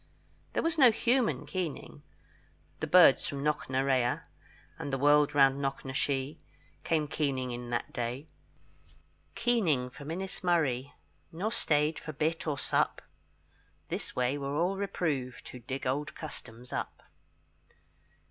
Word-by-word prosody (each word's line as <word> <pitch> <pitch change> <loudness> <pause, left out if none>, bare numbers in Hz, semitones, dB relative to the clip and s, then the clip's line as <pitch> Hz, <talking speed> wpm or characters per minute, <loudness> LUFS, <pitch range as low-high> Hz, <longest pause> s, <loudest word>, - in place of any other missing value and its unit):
There - - 0
was 330 -1 +1
no 260 -3 +9
human 235 +2 +1
keening; 180 -6 -5 0.8
The - - -2
birds 180 -6 +7
from 140 -1 -4
Knocknarea, 130 -4 +1 0.6
And 145 - -4
the 135 - 0
world 145 +1 +4
round 135 0 +5
Knocknashee, 135 +1 -2 0.4
Came 155 -2 +1
keening 135 -4 -1
in 120 0 -6
that 120 0 -2
day, 125 +5 -3 1.1
Keening 175 - +1
from 140 +2 -10
Innismurry, 165 -7 0 0.4
Nor 195 +7 -2
stayed 150 -7 +1
for 155 - -7
bit 160 +3 -1
or 145 -2 0
sup; - - +1 0.9
This - - -3
way 125 +3 0
were 140 0 -3
all 175 +5 +1
reproved 160 -10 -2
Who 125 - -9
dig 130 +3 -5
old 145 +5 -1
customs 125 -6 -8
up. - - -4
145 Hz, 125 wpm, -30 LUFS, 130-165 Hz, 1.1 s, no